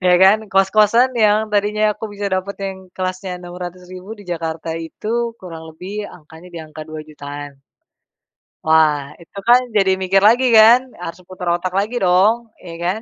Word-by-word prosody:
Ya 180 - +5
kan. 195 +3 +6
Kos-kosan 215 +6 +3
yang 215 -1 +3
tadinya 210 +1 +1
aku 220 - -6
bisa 205 0 -5
dapet 190 +1 -2
yang 190 -1 -6
kelasnya 185 0 -4
600.000 180 +2 -9
di 205 - -13
Jakarta 165 -1 -4
itu 225 +8 -3
kurang 165 -3 -9
lebih 195 +5 -6
angkanya 160 +2 -15
di - - -5
angka 155 0 -10
2.000.000-an. 145 -2 -9 1.0
Wah, 155 -3 +3
itu 170 +3 -16
kan 245 +1 +7 0.2
jadi 195 -2 +3
mikir 190 +1 +2
lagi 240 +5 +5
kan 240 +4 +6
harus 175 0 -8
putar 185 -1 -7
otak 175 +1 -2
lagi 210 +5 -1
dong, 205 +6 +2
ya 170 -2 -9
kan 190 +5 -1
185 Hz, 155 wpm, -19 LUFS, 165-210 Hz, 1.0 s, kan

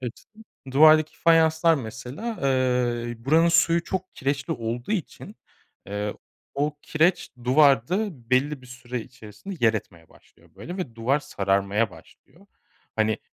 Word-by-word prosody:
Evet, 120 -1 -7 0.5
duvardaki 155 +3 +5
fayanslar 165 0 +4
mesela, 130 - -7 0.2
ııı, 125 -3 0
buranın 160 +5 +4
suyu 170 0 +3
çok 185 0 -4
kireçli 135 0 -2
olduğu 120 - -4
için, 190 -8 -5 0.5
eee, 105 +1 -3 0.4
o 145 +2 -1
kireç, 165 +4 +1
duvarda 140 - +2
belli 135 +2 +1
bir - - -14
süre 125 0 -6
içerisinde 125 - -10
yer 110 0 +4
etmeye 85 -6 -7
başlıyor 85 +1 -24
böyle, 165 - -7
ve 175 -12 -5
duvar 125 +5 +1
sararmaya 100 -2 0
başlıyor. - - -19 0.5
Hani, 110 -1 +1
130 Hz, 125 wpm, -25 LUFS, 115-155 Hz, 0.5 s, duvardaki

